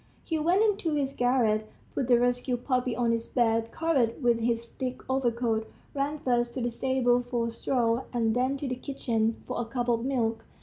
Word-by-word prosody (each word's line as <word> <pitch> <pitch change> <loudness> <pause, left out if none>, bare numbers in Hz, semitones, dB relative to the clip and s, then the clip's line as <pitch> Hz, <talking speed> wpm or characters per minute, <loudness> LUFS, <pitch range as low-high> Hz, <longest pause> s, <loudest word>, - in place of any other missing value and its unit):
He 320 -2 -1
went 350 +7 +3
into 400 -7 +1
his 275 -2 -1
garret, 225 -4 +2 0.2
put 265 - -1
the 245 -2 +5
rescued 245 0 0
puppy 250 -2 +1
on 235 -1 +1
his 230 0 -1
bed, 230 -2 +1
covered 310 -8 +2
it 230 - -12
with 235 -1 +3
his 235 0 0
thick 255 +1 -5
overcoat, 235 -4 0 0.3
ran 285 +2 -1
first 240 -3 0
to 260 - -2
the 240 0 -1
stable 245 0 +2
for 240 -1 -2
straw, 235 +1 0
and 230 -2 +1
then 255 +3 +1
to 275 - -4
the 255 - -2
kitchen 230 -5 -1
for - - -3
a - - -3
cup 245 +1 -2
of 230 -1 +1
milk. 230 -4 0
245 Hz, 200 wpm, -28 LUFS, 230-265 Hz, 0.3 s, the